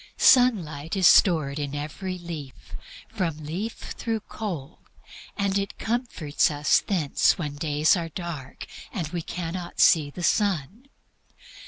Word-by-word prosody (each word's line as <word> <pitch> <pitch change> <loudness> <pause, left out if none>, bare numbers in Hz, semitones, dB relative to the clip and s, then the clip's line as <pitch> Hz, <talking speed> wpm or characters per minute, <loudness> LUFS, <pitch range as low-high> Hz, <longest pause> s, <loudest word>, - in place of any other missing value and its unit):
Sunlight 170 - +3
is 190 -2 +2
stored 155 -6 +5
in 145 -1 -3
every 170 +6 -5
leaf, 160 -7 -9 0.3
from 180 -8 -2
leaf 185 +10 -4 0.2
through 225 -2 -2
coal, 175 -9 -6 0.6
and 200 -1 +1
it 200 0 -5
comforts 225 - 0
us 145 -1 +3
thence 170 -8 +1
when 150 -5 -4
days 150 0 +2
are 170 -2 -3
dark 160 -6 -7 0.3
and 170 -8 -3
we 170 +1 -3
cannot 175 +1 -6
see 155 -3 +5
the 175 +5 -8
sun. 200 - 0
170 Hz, 130 wpm, -25 LUFS, 150-195 Hz, 0.6 s, stored